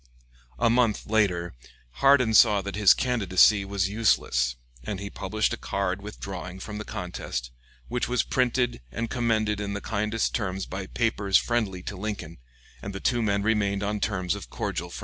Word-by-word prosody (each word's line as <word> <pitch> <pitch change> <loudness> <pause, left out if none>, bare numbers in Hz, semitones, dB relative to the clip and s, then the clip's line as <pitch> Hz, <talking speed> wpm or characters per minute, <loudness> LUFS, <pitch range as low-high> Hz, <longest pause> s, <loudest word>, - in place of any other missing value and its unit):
A - - +2
month 115 -2 +2
later 90 -6 +1 0.5
Hardin 135 -5 +5
saw 105 -2 +6
that 100 +1 -5
his 105 -3 +6
candidacy 105 -4 +3
was 100 -1 -1
useless, 80 - +1 0.3
and 95 +8 -4
he 100 0 -6
published 110 -1 -1
a - - -3
card 100 0 -2
withdrawing 95 -3 -7
from 105 +2 -6
the - - -4
contest, 65 - -5 0.4
which 125 +1 -1
was 125 -1 +1
printed 125 - 0
and 115 - -4
commended 110 -4 +1
in 100 0 -3
the 100 - -3
kindest 110 +1 -1
terms 95 -3 -2
by 95 0 -6
papers 105 -5 +2
friendly 105 -7 -1
to 100 - -5
Lincoln, 95 -5 -5 0.4
and 100 -1 -6
the - - -4
two 120 +2 +1
men 100 -2 +1
remained 100 -2 +1
on 105 +1 -1
terms 95 -4 -1
of - - -7
cordial - - -3
friendship. - - -8
100 Hz, 170 wpm, -26 LUFS, 95-110 Hz, 0.5 s, saw